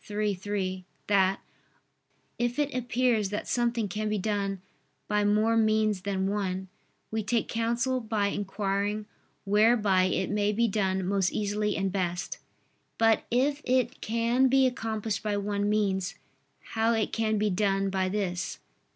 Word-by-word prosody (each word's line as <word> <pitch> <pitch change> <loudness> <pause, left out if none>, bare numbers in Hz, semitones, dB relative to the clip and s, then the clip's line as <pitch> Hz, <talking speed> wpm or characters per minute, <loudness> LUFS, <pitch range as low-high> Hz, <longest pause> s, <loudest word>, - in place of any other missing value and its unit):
iii, 210 0 0
3) 190 -1 -3 0.2
that 195 -1 +2 1.0
"if 240 +1 0
it 290 -1 0
appears 245 -4 +1
that 205 - -4
something 235 -2 0
can 215 +3 -3
be 210 - 0
done 200 -1 -1 0.5
by 210 0 +1
more 215 +2 +3
means 215 -3 +2
than 190 0 -1
one, 190 -2 -2 0.4
we 220 0 -1
take 220 +2 0
counsel 235 +3 0
by 220 -3 -1
inquiring 205 +1 -2 0.4
whereby 205 -2 +4
it 185 0 0
may 205 0 +1
be 230 +3 +2
done 190 -3 0
most 190 -1 +1
easily 210 0 -1
and 195 -1 0
best; 180 -2 -2 0.6
but 225 -1 +3
if 280 +4 +1
it 255 0 0
can 235 +3 +2
be 265 +1 +4
accomplished 220 -4 -2
by 210 -1 -1
one 205 0 -1
means, 195 -3 0 0.6
how 225 +1 +2
it 220 -2 -1
can 220 -1 +1
be 210 0 +1
done 195 0 +1
by 190 -1 0
this." 190 -2 -2
210 Hz, 145 wpm, -28 LUFS, 195-225 Hz, 1.0 s, whereby